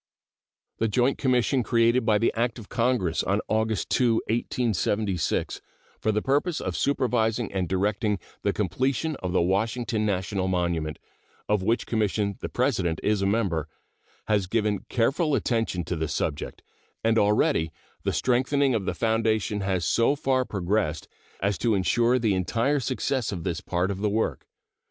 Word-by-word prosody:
The 115 - +2
joint 125 +5 +1
commission 130 0 +2
created 115 +1 +2
by 105 -1 +5
the 115 - +1
act 115 +1 0
of 110 -4 -11
Congress 115 -8 +1
of 100 +3 0
August 110 -3 0
2, 120 -3 +3
1876, 110 -4 -1 0.4
for 110 - +1
the 105 0 -1
purpose 145 +5 +1
of - - -3
supervising 120 -5 0
and 95 -3 -1
directing 100 +2 0 0.2
the - - +1
completion 130 - -1
of 90 - -4
the 90 - +2
Washington 110 +4 0
National 95 -1 -1
Monument, 85 -4 -1 0.5
of 105 -2 +2
which 115 +5 +1
commission 105 -2 0
the - - -5
President 100 - 0
is 105 -1 +1
a 95 - +2
member, 95 -8 0 0.6
has 105 -3 +1
given 105 -1 0
careful 140 +6 +1
attention 115 -9 0
to 90 - -3
this 80 -2 -2
subject, 70 - -3 0.4
and 115 0 +3
already 105 - +2 0.3
the - - -1
strengthening 130 +2 +2
of 105 -5 -1
the - - -2
foundation 110 -2 +1
has 95 -3 0
so 115 +5 +3
far 130 -2 +1
progressed 100 -5 -1 0.3
as 100 +1 0
to 115 -3 +2
insure 115 +6 +2
the 115 -5 +1
entire 115 +10 +1
success 130 -1 -1
of 90 -4 -5
this 90 0 -2
part 90 +2 -1
of 95 - -4
the 105 - +1
work. 110 +2 -1
110 Hz, 155 wpm, -26 LUFS, 95-120 Hz, 0.6 s, by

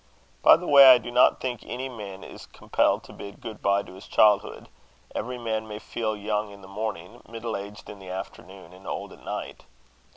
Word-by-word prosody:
By - - +8
the 180 - -8
way, 140 -4 +9
I 125 - +8
do 120 0 -7
not 125 +1 +4
think 125 -3 -4
any 130 +2 -5
man 100 -6 -9
is - - -11
compelled - - 0
to - - -13
bid 100 0 -10
good 110 -3 -9
bye 100 0 +2
to - - -13
his 95 - -13
childhood: 105 -2 +3 0.5
every 125 +3 -4
man 110 -2 -3
may 105 -1 -6
feel 110 0 -3
young 105 0 -2
in 100 0 -13
the 95 - -13
morning, 105 +1 -6
middle 115 0 -5
aged 100 +1 -8
in 105 - -10
the 95 -1 -11
afternoon, 95 -1 -9
and 95 +1 -14
old - - -5
at - - -17
night. - - -6
105 Hz, 205 wpm, -26 LUFS, 100-115 Hz, 0.5 s, way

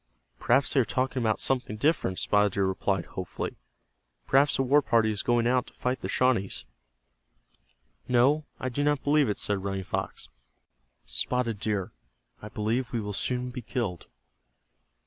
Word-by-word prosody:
"Perhaps 135 - +2
they 140 - +4
are - - +5
talking 130 +2 -1
about 110 -2 +1
something 125 -5 0
different," 140 - +1
Spotted 105 -1 +2
Deer 100 -1 +1
replied, 95 +1 -1
hopefully. 95 -2 -5 0.7
"Perhaps 140 +2 +3
a 135 - +2
war 140 +3 +4
party 115 -4 +2
is 105 - -3
going 120 -1 +2
out 125 +1 +2
to - - -15
fight 125 0 -2
the - - -4
Shawnees." 120 -7 +1 1.4
"No, 135 +5 +3
I 130 - -2
do 145 +4 -1
not 145 -1 +1
believe 145 -3 +3
it," 105 - -1
said 100 -2 -2
Running 95 -1 -2
Fox. - - -4 0.8
"Spotted 110 - -1
Deer, 105 -3 -2 0.5
I 105 - -8
believe 115 +4 -1
we 120 - -1
will 105 -1 -4
soon 125 +4 -2
be 125 - -6
killed." 110 - -3
120 Hz, 160 wpm, -28 LUFS, 105-130 Hz, 1.4 s, are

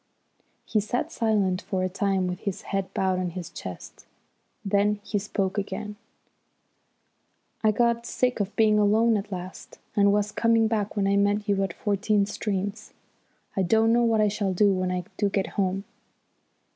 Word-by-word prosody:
He 215 - +1
sat 220 +4 -2
silent 205 -5 +1
for 185 -2 -2
a - - +1
time 195 0 0
with 180 0 -3
his 200 -3 -4
head 195 -1 -3
bowed 185 -1 0
on 180 -1 -1
his 175 -1 -7
chest. 90 -1 -9 0.6
Then 200 +1 +2
he 205 -1 -1
spoke 195 0 -2
again: 210 +1 -5 1.7
"I 215 - +5
got 235 +2 +1
sick 250 -1 0
of 205 0 -2
being 215 -1 +4
alone 220 +2 +4
at 210 0 -3
last, 185 0 -8 0.2
and 200 -1 +5
was 205 0 +1
coming 230 0 +3
back 215 -2 -1
when 200 -2 +1
I 200 0 +2
met 205 +1 +1
you 200 -1 +2
at 190 - -2
Fourteen 205 +1 +1
Streams. 205 0 -4 0.6
I 195 - +1
don't 220 +5 +3
know 240 - +4
what 225 -2 +3
I 210 - +4
shall 200 -2 -1
do 200 +1 +4
when 185 -1 -1
I 180 0 -2
do 205 - +1
get 195 -1 -1
home. 195 -1 -1
205 Hz, 170 wpm, -26 LUFS, 190-215 Hz, 1.7 s, I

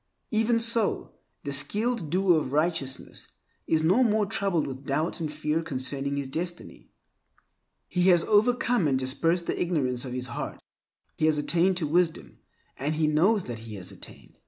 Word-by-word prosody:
Even 225 +1 +2
so 230 -1 +2 0.3
the 140 - -3
skilled 210 - +1
doer 180 -1 +3
of 135 -3 -5
righteousness 150 -4 -2 0.4
is 160 -1 +2
no 185 +10 +4
more 215 -3 +3
troubled 195 -5 0
with 135 0 -7
doubt 150 +6 -1
and 155 -2 -3
fear 150 +1 -1
concerning 140 -1 -3
his 140 -1 -3
destiny. 170 +5 -6 1.0
He 180 +1 +2
has 175 -2 +5
overcome 230 -2 +2
and 135 -2 +2
dispersed 165 +7 0
the - - -2
ignorance 130 -8 0
of 125 -2 -6
his 125 0 -3
heart. - - -5 0.6
He 155 - +3
has 155 -1 +3
attained 175 +5 +2
to 170 - -1
wisdom, 170 +1 0 0.4
and 145 +4 -1
he 155 0 +1
knows 180 +7 +3
that 120 -2 -6
he 110 -1 -9
has 95 -3 -7
attained. - - -13
160 Hz, 165 wpm, -27 LUFS, 140-190 Hz, 1.0 s, has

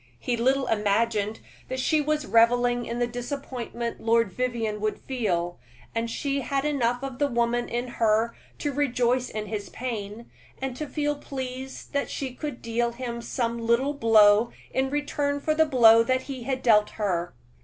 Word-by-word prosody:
He 245 - -1
little 265 +3 +2
imagined 215 0 0 0.3
that 260 0 -3
she 305 +3 +2
was 300 0 0
reveling 240 +1 +3
in 235 - -3
the 240 - +2
disappointment 240 -1 -5
Lord 230 -2 +2
Vivianne 230 -2 -2
would 215 0 -1
feel; 180 -9 -2 0.3
and 230 0 -1
she 275 +3 -1
had 275 +2 -1
enough 245 -4 0
of 265 -2 -5
the 290 - +3
woman 240 -1 0
in 240 +1 -2
her 225 -1 +1 0.2
to 290 - -2
rejoice 250 -2 +1
in 215 0 -4
his 210 -1 -5
pain, 225 -2 -5 0.3
and 265 -2 -3
to 305 +3 -4
feel 295 0 -1
pleased 265 -1 -7
that 280 0 0
she 265 -3 -4
could 290 -1 -6
deal 235 +1 0
him 235 -1 -5
some 235 -1 -2
little 235 +5 +2
blow 220 -3 +5 0.2
in 265 0 0
return 290 0 -1
for 310 +2 0
the 315 0 +3
blow 230 -5 +7
he 255 0 -2
had 260 0 -2
dealt 210 -3 +5
her. 175 - -1
240 Hz, 165 wpm, -26 LUFS, 230-265 Hz, 0.3 s, blow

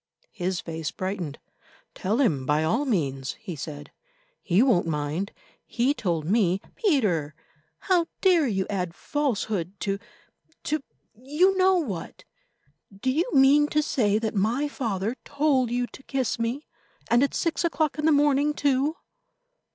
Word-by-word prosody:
His 180 0 -2
face 160 -2 -4
brightened. 185 -6 -4 0.6
"Tell 205 +5 -1
him 150 - +1
by 150 +1 +2
all 230 - +1
means," 140 - -1
he 210 -6 -8
said; 145 0 -7 0.5
"he 190 +5 +3
won't 215 -11 +3
mind. 155 +5 -2 0.4
He 250 +4 +1
told 170 - -2
me——" 190 -1 +2 0.2
"Peter, 200 - +1 0.5
how 355 -3 +2
dare 350 -6 +4
you 190 -4 0
add 180 -4 -3
falsehood 205 - -2
to—to—you 290 - -3
know 375 0 +4
what. 225 - -4 0.7
Do 200 +7 -2
you 320 +7 0
mean 285 +1 +5
to 305 0 +1
say 210 -8 +1
that 220 -1 -2
my 230 +8 +1
father 225 -4 -2
told 280 -4 +1
you 245 +1 0
to 255 - -13
kiss 265 -3 -2
me, 235 +6 -2 0.5
and 240 +1 +5
at 280 - +1
six 335 0 0
o'clock 315 -3 0
in 300 - 0
the 320 - +5
morning, 290 0 +3
too?" 285 +2 +1
230 Hz, 140 wpm, -26 LUFS, 180-290 Hz, 0.7 s, mean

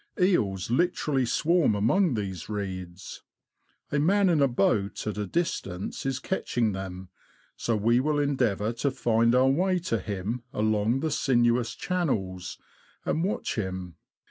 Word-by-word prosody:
Eels 110 - +1
literally 140 -3 +1
swarm 165 -4 +2
among 130 - +2
these 95 -5 -4
reeds. 95 -3 -6 0.7
A 145 - +1
man 195 +5 +3
in 160 -4 +3
a 140 - +5
boat 100 -4 0
at 105 - -2
a 105 - -2
distance 120 - -3
is 135 -1 -1
catching 120 - -1
them, 95 -1 -6 0.5
so 115 - -1
we 115 +3 +3
will 150 +3 +1
endeavour 125 -7 +1
to 140 +4 0
find 115 -2 +2
our 130 +1 +5
way 180 +6 +2
to 160 -11 -1
him 100 +5 -4
along 110 +4 +1
the 160 0 -1
sinuous 120 -4 +2
channels, 95 - -2 0.5
and 160 - 0
watch 195 - -1
him. 95 -4 -4
120 Hz, 145 wpm, -27 LUFS, 100-145 Hz, 0.7 s, a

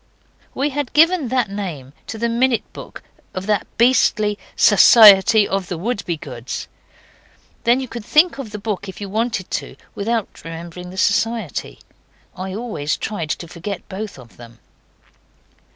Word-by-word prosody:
We 280 +3 0
had 285 -1 -3
given 325 -1 +4
that 250 -4 0
name 165 -10 -6
to 225 - -6
the 235 +2 0
minute 235 +1 +1
book - - -10 0.3
of 185 0 -4
that 210 -2 0
beastly 215 -4 +3 0.2
'Society 215 -1 +7
of 195 -2 -2
the 175 - -4
Wouldbegoods'. 160 - -4 1.0
Then 240 +2 +4
you 260 - -4
could 230 -1 -7
think 305 +5 +3
of 260 -5 -6
the 210 - -6
book 200 -2 -4
if 185 - -10
you 200 - -5
wanted 220 -2 -2
to - - -4 0.2
without 225 +1 -3
remembering 170 +2 -8
the 185 - -11
Society. 215 -2 -1 0.6
I 185 +1 -5
always 210 -10 -3
tried 170 -8 -4
to 170 - -3
forget 175 +3 -7
both 200 -1 -6
of 125 -3 -16
them. 120 -1 -13
210 Hz, 150 wpm, -20 LUFS, 180-235 Hz, 1.0 s, Society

